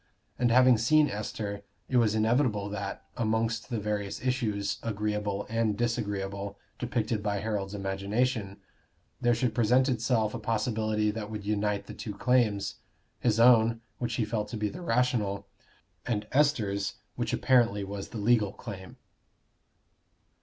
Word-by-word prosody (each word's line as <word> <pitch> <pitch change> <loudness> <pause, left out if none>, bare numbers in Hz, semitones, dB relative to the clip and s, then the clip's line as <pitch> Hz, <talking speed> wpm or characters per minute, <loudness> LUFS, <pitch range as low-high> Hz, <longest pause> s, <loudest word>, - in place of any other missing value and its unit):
And 120 -1 +3
having 125 -1 +6
seen 150 +6 +4
Esther, 105 -1 -4 0.3
it 130 - +1
was 110 -3 +3
inevitable 110 -2 +2
that, 100 -1 -5
amongst 110 0 0
the 115 - -1
various 105 -1 -2
issues, 110 -6 -1
agreeable 105 -2 -2
and 110 -2 0
disagreeable, 100 -4 -2 0.2
depicted 115 -3 -1
by 105 -1 -1
Harold's 105 -1 -3
imagination, 100 +2 -1 0.6
there 120 0 +3
should 120 -1 0
present 125 +3 +3
itself 115 -3 +1
a - - -4
possibility 110 -1 0
that 105 -1 -5
would 105 -2 -6
unite 105 -1 0
the - - -8
two 105 -3 -6
claims 110 -3 +1 0.4
his 115 -2 +1
own, 115 -1 +5 0.2
which 115 -2 -2
he 115 - 0
felt 105 -1 -2
to 115 - -5
be 105 -1 -1
the 180 - -8
rational, 115 - 0 0.6
and 105 -3 -1
Esther's, 110 -9 +1 0.2
which - - -2
apparently 115 -6 +3
was 100 0 -5
the - - -7
legal 105 -1 +3
claim. 95 -5 -9
110 Hz, 140 wpm, -29 LUFS, 100-120 Hz, 0.6 s, having